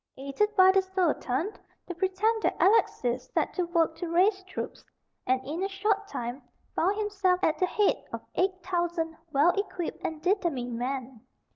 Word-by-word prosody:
Aided 280 +11 -1
by 375 -1 +7
the 385 0 +4
Sultan, 370 - -1 0.3
the 355 - -5
pretended 385 +5 +1
Alexis 260 - +2
set - - +1
to 360 - 0
work 335 -2 +1
to 350 - -4
raise 380 +4 +3
troops, 370 - -6 0.4
and, 255 0 +3
in 310 +6 -4
a 390 - 0
short 405 +1 0
time, 245 - -5 0.3
found 390 +5 +1
himself 400 -4 +1
at 315 - +2
the 365 - +3
head 415 +2 +1
of - - -6
eight 370 0 0
thousand 345 -2 -1 0.2
well 300 +4 +5
equipped 370 -3 -4
and 320 -1 -3
determined 325 - 0
men. 255 -2 -4
360 Hz, 160 wpm, -28 LUFS, 310-390 Hz, 0.4 s, by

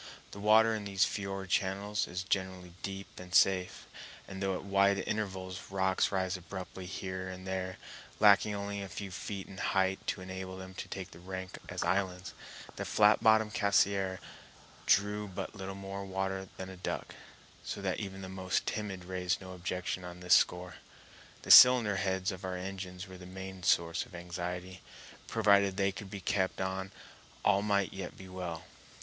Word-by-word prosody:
The 100 - -9
water 110 +2 +5
in 105 -2 -3
these 100 -1 +3
fiord 95 -2 -4
channels 100 +3 0
is 90 +1 -4
generally 95 -2 -2
deep 100 0 -6
and 90 0 -6
safe, 95 -2 +3 0.4
and 95 0 -7
though 95 -1 0
at - - -5
wide 100 0 +3
intervals 95 -3 -4
rocks 95 -1 +1
rise 95 -1 0
abruptly 90 0 -7
here 95 0 -4
and 95 0 -8
there, 95 -1 -3 0.4
lacking 105 0 +6
only 100 0 -3
a 100 - -6
few 100 0 -6
feet 95 +1 -5
in 95 -2 -10
height 95 +2 +1
to - - -1
enable 95 0 -6
them 95 0 -9
to - - -6
take 95 -1 -6
rank 95 +2 -7
as - - -2
islands, 95 -2 -1 0.4
the - - -2
flat 105 0 +4
bottomed 110 -1 +4
Cassiar 100 -2 +2 0.7
drew 105 +1 +3
but 95 - -5
little 95 -2 -6
more 100 0 -6
water 95 0 -3
than 95 0 -6
a 95 - -10
duck, 90 - -4 0.5
so - - -4
that - - -1
even 95 -1 -6
the - - -5
most 95 0 -1
timid 95 -4 -3
raised 90 0 -1
no 95 -1 -9
objection 90 0 -3
on 90 0 -8
this 90 0 +3
score. 90 0 +3 0.7
The - - +1
cylinder 120 -6 +9
heads 95 +1 0
of 95 +1 -8
our 95 -1 -3
engines 95 0 -6
were 95 -1 -11
the 90 - -10
main 95 0 -8
source 85 -1 +2
of 90 - -13
anxiety; 90 +1 -5 0.5
provided 100 -2 +4
they 100 0 +2
could 95 0 -8
be 100 0 -6
kept 95 +1 0
on 95 0 -2 0.5
all 100 -1 +5
might 100 -2 +1
yet 95 -2 -6
be 95 - -10
well. 90 -3 -5
95 Hz, 175 wpm, -32 LUFS, 95-100 Hz, 0.7 s, cylinder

